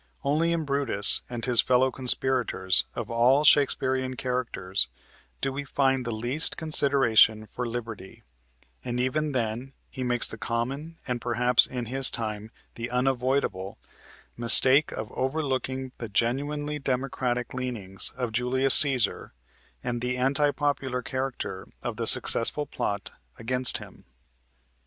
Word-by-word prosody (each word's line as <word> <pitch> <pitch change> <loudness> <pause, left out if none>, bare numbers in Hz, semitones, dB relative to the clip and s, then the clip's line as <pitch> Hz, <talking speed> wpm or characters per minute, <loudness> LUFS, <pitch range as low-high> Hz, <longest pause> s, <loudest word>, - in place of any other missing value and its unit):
Only 155 +4 0
in 165 -2 -2
Brutus 140 -8 +2
and 120 -2 -5
his 125 -3 +4
fellow 130 +1 +1
conspirators 125 -7 +1
of 115 -2 -6
all 125 +5 +3
Shakespearian 130 -3 +2
characters 125 -8 -2 0.5
do 135 -1 -2
we 145 +1 -5
find 135 -2 -1
the - - -2
least 120 +8 0
consideration 135 -8 +3
for 125 +3 -6
liberty, 115 -4 -8 0.6
and 120 0 -4
even 150 +4 -1
then 125 +1 -4 0.2
he 130 - -8
makes 120 -1 +2
the - - -8
common, 135 +8 -4
and 125 -2 -3
perhaps 125 +1 +4
in 125 -2 -6
his 130 +3 +2
time 110 -1 -4 0.2
the 115 +1 -6
unavoidable, 125 -6 -2 0.6
mistake 130 +5 +6
of 110 - -7
overlooking 130 -2 -3
the 115 - -6
genuinely 145 +8 -2
democratic 125 -2 -3
leanings 115 -7 -3
of 125 -3 -3
Julius 125 +3 +5
Cæsar 130 - -1 0.5
and 120 -1 -4
the 125 +1 -2
anti 140 +3 +1
popular 140 -4 -3
character 130 -8 -5 0.2
of - - -5
the - - -3
successful 145 +6 +4
plot 100 -6 -4 0.3
against 125 +2 +2
him. - - -14
125 Hz, 130 wpm, -25 LUFS, 115-135 Hz, 0.6 s, mistake